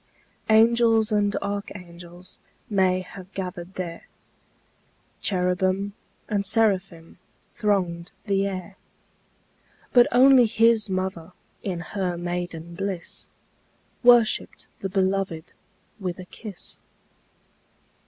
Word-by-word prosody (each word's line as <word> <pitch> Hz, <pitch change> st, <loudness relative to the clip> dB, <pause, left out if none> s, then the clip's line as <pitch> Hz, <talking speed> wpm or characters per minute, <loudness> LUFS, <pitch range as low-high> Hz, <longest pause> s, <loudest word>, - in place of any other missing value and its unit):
Angels 225 Hz, 0 st, +4 dB
and 205 Hz, -1 st, +2 dB
archangels 180 Hz, -3 st, -7 dB, 0.3 s
May 185 Hz, -2 st, +2 dB
have 185 Hz, 0 st, -11 dB
gathered 185 Hz, -1 st, -6 dB
there, 170 Hz, -2 st, -6 dB, 1.1 s
Cherubim 185 Hz, +1 st, 0 dB, 0.3 s
and 205 Hz, -2 st, 0 dB
seraphim 190 Hz, -6 st, 0 dB, 0.3 s
Thronged 180 Hz, -6 st, -1 dB
the 195 Hz, -1 st, +1 dB
air; 190 Hz, 0 st, -6 dB, 1.2 s
But 245 Hz, -1 st, +7 dB
only 255 Hz, 0 st, +7 dB
His 225 Hz, -1 st, +3 dB
mother, 185 Hz, -2 st, -3 dB, 0.3 s
In 180 Hz, -4 st, -3 dB
her 180 Hz, 0 st, -3 dB
maiden 175 Hz, -1 st, -4 dB
bliss, 190 Hz, -1 st, -5 dB, 0.7 s
Worshipped 240 Hz, -3 st, +4 dB
the 195 Hz, -, -3 dB
Beloved 190 Hz, -3 st, -1 dB, 0.5 s
With 185 Hz, -3 st, -3 dB
a 185 Hz, -, -9 dB
kiss. 205 Hz, 0 st, -10 dB
190 Hz, 90 wpm, -25 LUFS, 180-210 Hz, 1.2 s, But